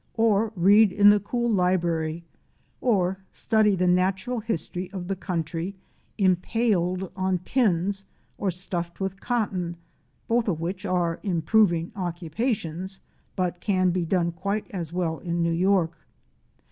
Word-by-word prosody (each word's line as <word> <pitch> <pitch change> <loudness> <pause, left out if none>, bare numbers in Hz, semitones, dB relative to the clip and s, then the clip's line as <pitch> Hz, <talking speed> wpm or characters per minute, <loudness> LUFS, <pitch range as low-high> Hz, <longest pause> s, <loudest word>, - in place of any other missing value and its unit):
or 220 -1 +2
read 200 +3 +6
in 205 +1 +7
the 205 - +4
cool 240 +4 -2
library, 170 -5 +1 0.6
or 190 -6 +1
study 215 -3 +2
the 185 0 +1
natural 190 +6 +1
history 180 -4 -3
of 180 -2 -5
the 195 - -1
country 175 0 -3 0.4
impaled 185 -1 +1
on 185 -1 0
pins 195 -2 +1 0.4
or 200 - 0
stuffed 175 -1 -4
with 195 0 -3
cotton 190 -8 -2 0.5
(both 230 0 +1
of 170 -6 0
which 180 +3 -4
are 175 -2 0
improving 175 -1 +2
occupations 180 - -3 0.4
but 180 -1 -1
can 185 -4 +2
be 180 0 0
done 170 0 +1
quite 200 +5 -2
as 170 -5 -4
well 170 -2 -1
in 170 -1 -1
New 170 0 +1
York). 180 -1 +2
185 Hz, 135 wpm, -25 LUFS, 170-205 Hz, 0.6 s, in